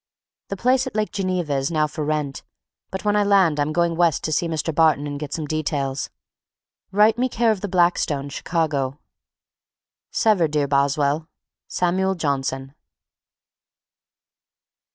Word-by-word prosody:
The 195 Hz, -, -5 dB
place 255 Hz, +5 st, +2 dB
at 260 Hz, -, -7 dB
Lake 215 Hz, -1 st, 0 dB
Geneva 185 Hz, -6 st, -1 dB
is 135 Hz, +1 st, -1 dB
now 155 Hz, -2 st, +1 dB
for 150 Hz, +1 st, -5 dB
rent 150 Hz, -2 st, -2 dB, 0.5 s
but 190 Hz, +2 st, -6 dB
when 205 Hz, 0 st, +2 dB
I 210 Hz, -, +3 dB
land 190 Hz, -7 st, +3 dB
I'm 145 Hz, +1 st, 0 dB
going 170 Hz, +1 st, +1 dB
West 170 Hz, -3 st, +2 dB
to 155 Hz, -, -2 dB
see 160 Hz, +3 st, +1 dB
Mr. 160 Hz, 0 st, -2 dB
Barton 155 Hz, -2 st, +3 dB
and 145 Hz, -1 st, -5 dB
get 150 Hz, -1 st, -6 dB
some 155 Hz, 0 st, -3 dB
details. 145 Hz, -3 st, -2 dB, 0.8 s
Write 210 Hz, +3 st, +4 dB
me 255 Hz, +1 st, +1 dB
care 235 Hz, -1 st, +2 dB
of 205 Hz, -4 st, -2 dB
the 205 Hz, -, -2 dB
Blackstone, 175 Hz, -6 st, +1 dB
Chicago. 145 Hz, -3 st, -1 dB, 1.1 s
S'ever, 205 Hz, -7 st, +2 dB
dear 150 Hz, -1 st, 0 dB
Boswell, 140 Hz, +2 st, +1 dB, 0.4 s
SAMUEL 190 Hz, +2 st, 0 dB
JOHNSON. 135 Hz, -4 st, -2 dB
160 Hz, 145 wpm, -22 LUFS, 145-190 Hz, 1.1 s, Write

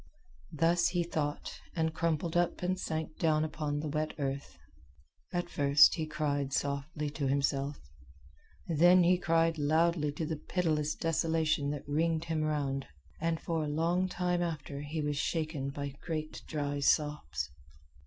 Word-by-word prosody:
Thus 170 Hz, +2 st, +3 dB
he 175 Hz, -1 st, +1 dB
thought, 150 Hz, -3 st, -3 dB, 0.2 s
and 160 Hz, -1 st, 0 dB
crumpled 165 Hz, 0 st, -1 dB
up 175 Hz, +1 st, +1 dB
and 185 Hz, +1 st, 0 dB
sank 160 Hz, -2 st, -4 dB
down 155 Hz, -2 st, +3 dB
upon 150 Hz, -2 st, -2 dB
the 155 Hz, -, -3 dB
wet 155 Hz, +1 st, -2 dB
earth. 140 Hz, -1 st, -3 dB, 0.7 s
At 175 Hz, -1 st, -1 dB
first 145 Hz, -2 st, +6 dB
he 160 Hz, -1 st, -2 dB
cried 145 Hz, -3 st, -1 dB
softly 145 Hz, +2 st, -2 dB
to 145 Hz, -2 st, -2 dB
himself, 140 Hz, +1 st, 0 dB, 0.9 s
then 175 Hz, +3 st, +6 dB
he 180 Hz, +1 st, +4 dB
cried 165 Hz, -1 st, +2 dB
loudly 155 Hz, +1 st, +2 dB
to 160 Hz, +2 st, -3 dB
the 155 Hz, 0 st, -3 dB
pitiless 155 Hz, -4 st, +1 dB
desolation 160 Hz, -3 st, +1 dB
that 145 Hz, -1 st, -5 dB
ringed 160 Hz, +2 st, +1 dB
him 160 Hz, -2 st, -1 dB
around; 140 Hz, -3 st, -1 dB, 0.3 s
and 165 Hz, 0 st, 0 dB
for 165 Hz, -2 st, -1 dB
a -, -, -2 dB
long 170 Hz, +5 st, +1 dB
time 180 Hz, -1 st, 0 dB
after 155 Hz, -4 st, -3 dB
he 150 Hz, +1 st, -3 dB
was 145 Hz, -1 st, -1 dB
shaken 155 Hz, -3 st, -1 dB
by 140 Hz, 0 st, -5 dB
great 155 Hz, -2 st, -4 dB
dry 145 Hz, -2 st, -2 dB
sobs. 140 Hz, -, +1 dB
155 Hz, 150 wpm, -32 LUFS, 145-165 Hz, 0.9 s, first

